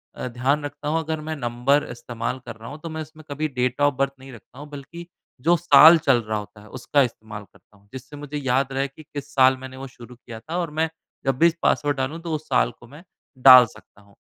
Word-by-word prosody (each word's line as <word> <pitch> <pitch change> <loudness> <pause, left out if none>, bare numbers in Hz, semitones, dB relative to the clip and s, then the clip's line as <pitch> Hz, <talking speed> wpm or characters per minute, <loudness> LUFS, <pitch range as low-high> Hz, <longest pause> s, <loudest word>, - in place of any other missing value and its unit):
अ, - - -5
ध्यान 130 +5 -1
रखता 145 0 -7
हूँ 160 +2 +1
अगर 160 -1 -4
मैं 155 - -2
नंबर 135 +2 0
इस्तेमाल 120 +1 -5
कर 115 - -8
रहा 110 +1 -11
हूँ 145 +1 -9
तो 165 - -5
मैं 160 0 -5
इसमें 155 +1 -12
कभी 155 +2 -2
डेट 125 +2 -1
ऑफ 145 -1 +3
बर्थ 140 -1 +1
नहीं 135 0 -12
रखता 120 +3 -16
हूँ 145 - -9
बल्कि 150 +5 -10 0.4
जो 175 - +6
साल 160 0 +8
चल 125 -3 +4
रहा 110 0 -1
होता 105 0 -12
है 105 - -16
उसका 140 +4 +2
इस्तेमाल 110 -3 -7
करता 105 - -25
हूँ 100 0 -28
जिससे 130 +3 -10
मुझे 145 0 -6
याद 135 0 0
रहे 135 +1 -1
कि 155 +3 -16
किस 145 0 -7
साल 130 -1 +4
मैंने 130 0 -10
वो 135 0 -7
शुरू 125 0 -14
किया 115 -2 -11
था 160 +9 -6
और 170 -3 -3
मैं 160 - +1 0.4
जब 135 -1 0
भी 170 - +6
इस 170 - -1
पासवर्ड 145 -1 +1
डालूँ 135 +5 -3
तो 165 -1 -5
उस 155 0 -7
साल 125 -3 +2
को 120 - -16
मैं 150 +6 -14 0.5
डाल 125 -1 +10
सकता 100 -1 -18
हूँ। 100 0 -24
135 Hz, 250 wpm, -23 LUFS, 120-150 Hz, 0.5 s, डाल